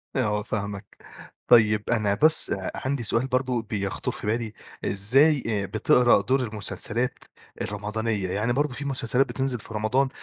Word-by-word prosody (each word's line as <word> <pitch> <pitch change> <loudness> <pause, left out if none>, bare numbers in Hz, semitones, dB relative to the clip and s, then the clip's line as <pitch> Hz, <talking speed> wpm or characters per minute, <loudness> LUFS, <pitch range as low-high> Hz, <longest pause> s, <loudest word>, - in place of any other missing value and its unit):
آه 105 0 +1
فاهمك. 100 -2 -5 0.5
طيب، 105 -3 +5
أنا 105 -4 +2
بس 155 +10 +3
أ 95 -1 -2
عندي 130 -2 -2
سؤال 115 +4 +1
برضه 125 -2 0
بيخطر 100 -3 -3
في - - -7
بالي، 110 0 -1 0.3
إزاي 135 +9 +3
آآ، 105 -3 0
بتقرا 120 +4 +4
دور 130 +5 +1
المسلسلات 110 +2 -3 0.4
الرمضانية؟ 105 -1 -2
يعني 110 +6 0
برضه 145 -1 0
في 140 +3 -6
مسلسلات 130 -1 +1
بتنزل 130 -1 -2
في 115 - -10
رمضان 125 +6 +1
115 Hz, 145 wpm, -25 LUFS, 105-130 Hz, 0.5 s, طيب